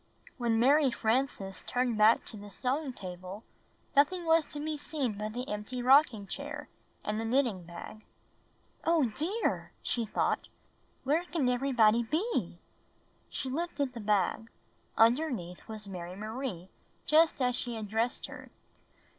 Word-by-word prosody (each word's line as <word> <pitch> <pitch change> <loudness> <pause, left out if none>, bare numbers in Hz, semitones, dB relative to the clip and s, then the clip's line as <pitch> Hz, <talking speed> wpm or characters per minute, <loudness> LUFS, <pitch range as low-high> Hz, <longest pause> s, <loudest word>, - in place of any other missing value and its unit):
When 235 -2 +2
Mary 280 +3 +5
Frances 225 -5 -1
turned 245 -2 0
back 215 +2 +5
to - - -7
the 205 0 -9
sewing 265 +7 -1
table 185 -1 -8 0.5
nothing 335 +5 +3
was 325 -2 +4
to 295 - -5
be 310 +1 -2
seen 290 -5 -2
but 215 0 -3
the 250 +2 -4
empty 210 +4 -4
rocking 255 -5 +5
chair 290 +8 -6 0.3
and 210 +1 -1
the - - -2
knitting 225 -6 +1
bag. 175 +5 -9 0.4
" - - -37 0.3
Oh, 320 -7 +3
dear," 370 - -1
she 235 -2 0
thought, - - 0 0.6
"where 300 +6 +2
can 325 -7 0
everybody 245 -3 +4
be?" 325 - -1 0.7
She - - -3
lifted 285 -2 -2
the 235 - -6
bag. 210 +1 +1 0.5
Underneath 230 - +2
was 215 -2 -8
Mary 180 -2 -6
Marie 215 -3 -5 0.4
just 315 0 +5
as 250 -2 +2
she 245 -2 -3
had 220 -2 -5
dressed 225 +4 -1
her. - - -10
245 Hz, 145 wpm, -31 LUFS, 215-285 Hz, 0.7 s, Mary